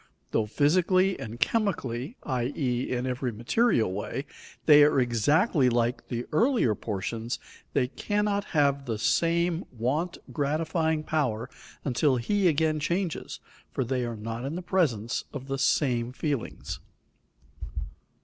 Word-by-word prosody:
Though 110 -1 +1
physically 185 - +3
and 115 +2 -7
chemically, 140 - -1
i.e., 125 -1 -1
in 125 0 -1
every 125 -1 -1
material 115 - +2
way, 105 +7 -4 0.4
they 150 -1 +8
are 145 -2 +4
exactly 130 - +3
like 120 0 0
the 120 -1 -3
earlier 230 - +3
portions, 110 +3 -3 0.4
they 130 -3 +2
cannot 205 - -1
have 140 -2 +1
the 115 -2 -1
same 170 - +2
want 135 +9 -1 0.2
gratifying 160 +1 0
power 125 -7 -1 0.3
until 135 +1 +2
he 190 - +1
again 155 -1 +2
changes, 170 +2 -2 0.3
for - - -1
they 125 +1 -1
are 120 -2 -4
not 115 +2 -5
in 140 +4 -3
the 180 - -4
presence 135 - 0
of 135 -2 -6
the 135 0 -2
same 125 -4 +2
feelings. 140 -2 -3
140 Hz, 130 wpm, -28 LUFS, 120-165 Hz, 0.4 s, they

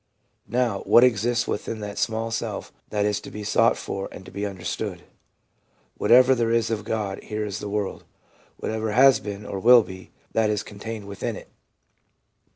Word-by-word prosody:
Now, 120 -5 +1
what 120 - +7
exists 120 0 +2
within 110 +1 -3
that 105 -1 -5
small 115 0 -1
self 115 - -4 0.2
that 105 -1 0
is 105 0 0
to - - -9
be 105 - -7
sought 115 +2 +3
for 95 0 -5
and 95 - -10
to - - -11
be 100 +1 -3
understood.... 90 -3 -5 0.9
Whatever 130 +2 +6
there 115 -3 +1
is 115 -1 +1
of 110 -2 -2
God 105 -3 -3
here 105 0 -4
in 105 - -5
the 105 - -5
world, 105 -1 -3 0.5
whatever 110 -1 -2
has 135 +2 +6
been 105 0 -7
or 100 - -4
will 120 +3 +7
be, 95 -2 -11 0.2
that 110 -1 +2
is 105 -1 -1
con 100 -2 -12
tained 110 -1 -6
within 100 0 -4
it. - - -11
105 Hz, 180 wpm, -24 LUFS, 100-115 Hz, 0.9 s, what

